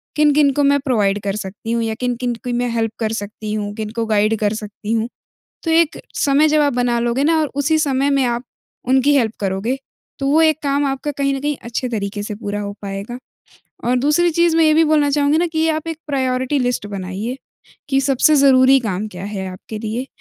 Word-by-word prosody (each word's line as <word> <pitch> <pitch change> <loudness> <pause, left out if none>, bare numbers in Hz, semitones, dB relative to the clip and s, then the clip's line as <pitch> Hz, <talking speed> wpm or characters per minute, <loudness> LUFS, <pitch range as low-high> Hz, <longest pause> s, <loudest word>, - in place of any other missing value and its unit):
किन-किन 295 -1 +4
को 290 - +1
मैं 285 0 +4
प्रोवाइड 210 -7 +1
कर 200 0 -2
सकती 210 +2 -6
हूँ 235 0 0
या 220 -1 -2
किन-किन 245 0 -1
की 245 - -2
मैं 245 0 0
हेल्प 225 -1 -1
कर 220 -1 -1
सकती 210 +1 -6
हूँ। 205 -1 -3
किनको 220 +1 -3
गाइड 215 0 +2
कर 210 -1 +1
सकती 210 0 -5
हूँ। 225 +1 0 0.5
तो 330 - -1
एक 325 -1 +2 0.2
समय 285 +2 +3
जब 305 0 +3
आप 285 -3 +2
बना 245 -1 +1
लोगे 240 +3 0
ना 320 +1 +3
और 305 - 0
उसी 290 +3 +2
समय 280 -1 +1
में 275 -1 +2
आप 240 0 -1 0.5
उनकी 265 +2 +4
हेल्प 225 -4 +1
करोगे, 200 +6 -1 0.4
तो 275 - -1
वो 305 +3 +4
एक 315 -2 +4
काम 280 0 +1
आपका 275 +2 -2
कहीं 275 0 -1
न - - -3
कहीं 295 +1 -1
अच्छे 235 +2 -3
तरीके 205 -2 -3
से 210 -1 -5
पूरा 205 -1 -4
हो 200 0 -5
पाएगा। 200 +4 -5 0.7
और 245 +1 +2
दूसरी 300 +6 +2
चीज़ 340 0 +2
मैं 330 - +5
ये 310 -1 +4
भी 325 +1 +5
बोलना 300 -2 +3
चाहूँगी 290 +1 +2
ना, 350 - +2
कि 320 -1 0
आप 315 0 -1
एक 325 -1 -4
प्रायोरिटी 260 -1 0
लिस्ट 245 -5 -1
बनाइए, 200 +5 -5 0.5
कि 270 -1 +2
सबसे 275 +3 +3
ज़रूरी 270 -1 +6
काम 210 -3 -3
क्या 185 -1 -8
है 200 -2 -4
आपके 210 +4 -8
लिए, 225 +4 -4
250 Hz, 215 wpm, -19 LUFS, 215-285 Hz, 0.7 s, ज़रूरी